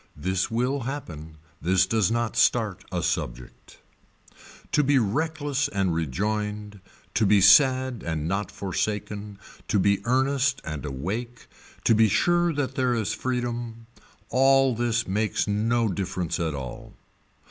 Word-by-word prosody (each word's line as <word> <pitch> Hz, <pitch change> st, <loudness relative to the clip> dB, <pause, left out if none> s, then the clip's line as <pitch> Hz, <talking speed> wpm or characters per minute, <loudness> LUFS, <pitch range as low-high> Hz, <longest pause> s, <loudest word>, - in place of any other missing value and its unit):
This 95 Hz, +6 st, -1 dB
will 125 Hz, +5 st, 0 dB
happen. 85 Hz, -, -7 dB, 0.2 s
This 95 Hz, +2 st, +3 dB
does 110 Hz, -4 st, +1 dB
not 115 Hz, -1 st, -1 dB
start -, -, +2 dB
a -, -, -2 dB
subject. -, -, -4 dB, 0.9 s
To 150 Hz, -, +3 dB
be 140 Hz, 0 st, +3 dB
reckless 145 Hz, +4 st, 0 dB
and 95 Hz, -3 st, -1 dB
rejoined, 105 Hz, +6 st, -3 dB, 0.3 s
to 110 Hz, -, +1 dB
be 100 Hz, 0 st, +5 dB
sad 130 Hz, +4 st, +5 dB
and 80 Hz, -2 st, -3 dB
not 100 Hz, +3 st, -2 dB
forsaken, 105 Hz, +1 st, -4 dB, 0.3 s
to 110 Hz, -, +1 dB
be 100 Hz, 0 st, +2 dB
earnest 135 Hz, +2 st, +1 dB
and 75 Hz, -2 st, -5 dB
awake, 110 Hz, -, -5 dB, 0.4 s
to -, -, +4 dB
be 110 Hz, 0 st, +5 dB
sure 175 Hz, -, +2 dB
that 140 Hz, -4 st, -2 dB
there 130 Hz, -2 st, +1 dB
is 110 Hz, -5 st, -1 dB
freedom, 120 Hz, -2 st, -4 dB, 0.5 s
all 135 Hz, 0 st, +4 dB
this 115 Hz, 0 st, -1 dB
makes 105 Hz, +3 st, 0 dB
no 115 Hz, +3 st, +1 dB
difference 95 Hz, -3 st, -3 dB
at 80 Hz, -3 st, -1 dB
all. 65 Hz, -3 st, -8 dB
110 Hz, 135 wpm, -25 LUFS, 95-130 Hz, 0.9 s, be